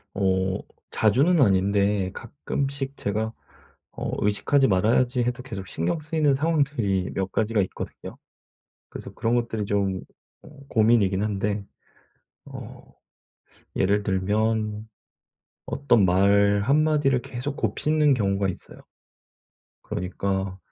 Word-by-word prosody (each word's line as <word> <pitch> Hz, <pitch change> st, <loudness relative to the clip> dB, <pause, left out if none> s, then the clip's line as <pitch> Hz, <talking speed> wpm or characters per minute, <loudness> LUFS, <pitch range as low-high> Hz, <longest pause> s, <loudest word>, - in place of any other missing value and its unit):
어. 95 Hz, -1 st, +1 dB, 0.4 s
자주는 140 Hz, -, +3 dB
아닌데 100 Hz, -2 st, +2 dB
가끔씩 140 Hz, +3 st, -4 dB
제가 110 Hz, +2 st, -2 dB, 0.6 s
어 -, -, -5 dB
'의식하지 135 Hz, +7 st, +2 dB
말아야지.' 120 Hz, +6 st, +2 dB
해도 125 Hz, +1 st, -2 dB
계속 100 Hz, -7 st, -7 dB
신경 85 Hz, -, -1 dB
쓰이는 155 Hz, -2 st, +1 dB
상황들이 140 Hz, -, 0 dB
몇 95 Hz, -1 st, -2 dB
가지가 110 Hz, 0 st, +1 dB
있거든요. 95 Hz, -, -8 dB, 0.7 s
그래서 -, -, -8 dB
그런 115 Hz, +1 st, 0 dB
것들이 115 Hz, -3 st, -1 dB
좀 100 Hz, -2 st, -1 dB, 0.4 s
어 -, -, -14 dB, 0.2 s
고민이긴 105 Hz, -4 st, +3 dB
한데 105 Hz, -1 st, -1 dB, 0.8 s
어 -, -, -10 dB, 0.9 s
예를 100 Hz, +2 st, +2 dB
들면 105 Hz, +2 st, -1 dB, 0.8 s
어떤 135 Hz, -7 st, +2 dB
말 100 Hz, +2 st, +4 dB
한마디를 145 Hz, -1 st, +2 dB
계속 125 Hz, +4 st, -5 dB
곱씹는 150 Hz, +6 st, +2 dB
경우가 100 Hz, -4 st, 0 dB
있어요. 95 Hz, -, -8 dB, 1.0 s
그러니까 95 Hz, +1 st, -3 dB
105 Hz, 245 characters per minute, -25 LUFS, 100-135 Hz, 1.0 s, 말